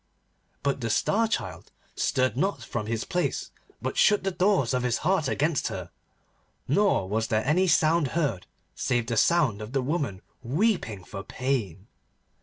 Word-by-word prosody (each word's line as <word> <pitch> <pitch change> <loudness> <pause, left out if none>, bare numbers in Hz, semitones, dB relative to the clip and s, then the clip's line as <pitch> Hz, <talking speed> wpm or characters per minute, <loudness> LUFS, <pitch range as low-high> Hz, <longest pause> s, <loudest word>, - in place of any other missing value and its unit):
But 140 -1 0
the 115 - -2
Star 220 - +2
Child 220 - -4 0.2
stirred 130 -4 +1
not 160 - -1
from 110 -1 -4
his 115 0 -1
place, 180 - -2 0.3
but - - -3
shut 210 -2 +4
the 195 - 0
doors 180 - +2
of 125 - +1
his 125 -2 +1
heart 180 -5 +2
against 150 +1 0
her, 90 -2 -6 0.8
nor 175 - +2
was 110 +3 -1
there 110 -2 0
any 180 +7 +3
sound 165 -1 +3
heard 135 - -1 0.3
save 120 -2 0
the 115 0 -2
sound 135 -5 +3
of 105 +4 -7
the 135 - +1
woman 130 - -2 0.2
weeping 130 - 0
for 95 +2 -7
pain. 110 -6 -3
130 Hz, 160 wpm, -27 LUFS, 110-170 Hz, 0.8 s, shut